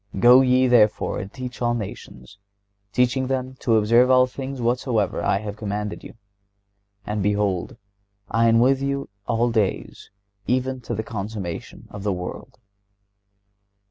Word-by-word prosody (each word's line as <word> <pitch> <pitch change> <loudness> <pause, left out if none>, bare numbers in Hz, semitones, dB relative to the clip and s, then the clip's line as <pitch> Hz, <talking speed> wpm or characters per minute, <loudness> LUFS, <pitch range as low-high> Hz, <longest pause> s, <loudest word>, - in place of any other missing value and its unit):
Go 125 +6 +7
ye, 130 0 +3
therefore, 110 -4 +3
and 95 +1 -7
teach 125 -2 -8
all 120 0 +1
nations,... 100 - -8 0.5
teaching 125 +3 +1
them 130 0 -2
to 115 -3 +2
observe 115 +4 +4
all 130 0 +6
things 135 +1 -7
whatsoever 120 -3 0
I - - +2
have 105 -1 -6
commanded 105 -1 -4
you. - - -11 0.9
And 105 0 -2
behold 100 -2 -1 0.5
I 115 +3 +2
am 115 0 +4
with 135 +3 +3
you 140 0 -2 0.2
all 120 0 +1
days, 110 -4 -2 0.4
even 130 +1 -1
to 120 - -1
the 110 - -3
consummation 100 -5 -6
of 105 - -8
the 100 0 -1
world." 90 0 -7
115 Hz, 140 wpm, -23 LUFS, 105-125 Hz, 0.9 s, Go